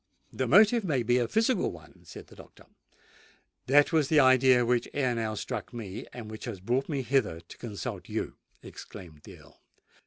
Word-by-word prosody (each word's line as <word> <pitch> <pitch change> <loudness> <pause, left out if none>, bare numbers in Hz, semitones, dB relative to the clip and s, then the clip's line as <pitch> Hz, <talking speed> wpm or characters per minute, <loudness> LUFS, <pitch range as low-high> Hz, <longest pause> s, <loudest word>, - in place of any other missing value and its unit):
"The 130 - -2
motive 210 - +5
may 140 -9 0
be 120 +2 +2
a 120 - 0
physical 225 - +1
one," 80 -2 -15
said - - -11
the - - -17
doctor. - - -16 1.0
"That 145 +4 +4
was 155 -4 +3
the 155 0 +4
idea 130 -2 +5
which 120 0 0
ere 130 -4 +1
now 110 -2 -3
struck 120 +1 -6
me, 105 -4 -7
and 110 -3 -9
which 110 - -8
has 95 - -6
brought 125 - -1
me 140 -4 -2
hither 120 -9 0
to 85 - -15
consult 105 -4 -6
you!" - - -4 0.3
exclaimed 85 -7 -12
the - - -12
Earl. - - -20
125 Hz, 185 wpm, -28 LUFS, 110-140 Hz, 1.0 s, motive